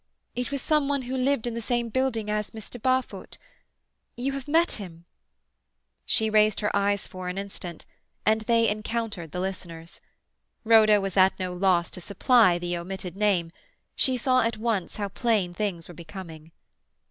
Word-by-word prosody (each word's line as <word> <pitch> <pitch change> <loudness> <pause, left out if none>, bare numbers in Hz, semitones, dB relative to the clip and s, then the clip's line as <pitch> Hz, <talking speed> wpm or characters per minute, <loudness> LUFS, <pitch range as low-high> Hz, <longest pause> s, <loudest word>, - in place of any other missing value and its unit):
It 250 0 -2
was 280 -2 -3
some 300 -2 +2
one 280 -2 0
who 255 +1 -4
lived 260 -2 +1
in 240 - -2
the 230 - -4
same 240 +1 -1
building 240 -3 0
as 210 0 -1
Mr. 225 +1 -9
Barfoot. 255 +1 -1 0.8
You 260 +3 -1
have 275 -1 -6
met 330 +3 +3
him—" 170 -3 -10 1.0
She 220 - +2
raised 215 -1 +3
her 210 - 0
eyes 200 0 +1
for 185 -1 -6
an 180 - -5
instant, 190 -4 -7 0.4
and 220 +1 +3
they 230 +1 +3
encountered 215 -5 -3
the 180 - -4
listener's. 170 -3 -6 0.6
Rhoda 220 -2 +6
was 195 -1 -3
at 190 0 +5
no 185 -1 -2
loss 180 -2 +2
to 180 - -8
supply 200 0 +4
the 175 0 -3
omitted 180 0 -6
name; 195 -5 +1 0.4
she 260 -1 +2
saw 255 +1 +3
at 230 -1 0
once 215 -5 -1
how 205 -1 -2
plain 200 -3 0
things 185 -4 -3
were 175 - -10
becoming. 165 -2 -10
210 Hz, 170 wpm, -26 LUFS, 180-235 Hz, 1.0 s, Rhoda